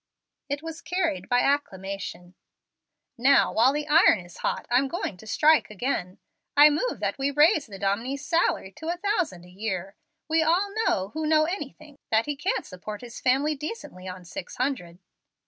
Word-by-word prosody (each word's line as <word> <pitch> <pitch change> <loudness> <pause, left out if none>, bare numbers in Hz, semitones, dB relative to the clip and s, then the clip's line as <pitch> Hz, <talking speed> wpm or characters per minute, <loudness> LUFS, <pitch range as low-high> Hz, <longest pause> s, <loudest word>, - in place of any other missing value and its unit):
It 285 +2 -3
was 325 0 -7
carried 335 -3 -2
by 245 0 +4
acclamation. 195 -9 -2 0.9
"Now, 275 +3 +4
while 240 +4 +5
the 295 +1 -3
iron 310 - +6
is 175 0 -13
hot, - - -2
I'm 260 +3 +4
going 270 - -3
to 220 - -14
strike 310 +6 +4
again. 210 -4 -3 0.4
I 295 +1 +9
move - - -1
that - - -2
we 270 +1 +1
raise 295 0 +4
the 200 -3 -9
dominie's 230 +9 -2
salary 330 - +1
to 320 - -7
a 345 +1 -1
thousand 350 - -1
a - - -15
year. 190 -1 -4 0.3
We 320 0 +2
all 360 +6 +2
know, 190 +1 +1
who 315 +7 -3
know 310 0 +4
anything, 300 -4 -6
that 225 0 +3
he 295 - -2
can't 330 +8 -1
support 205 +3 -8
his 240 -1 -9
family 270 +4 +2
decently 300 - -7
on 185 -1 -8
six 170 +1 -7
hundred." 245 -11 -2
275 Hz, 175 wpm, -26 LUFS, 195-310 Hz, 0.9 s, I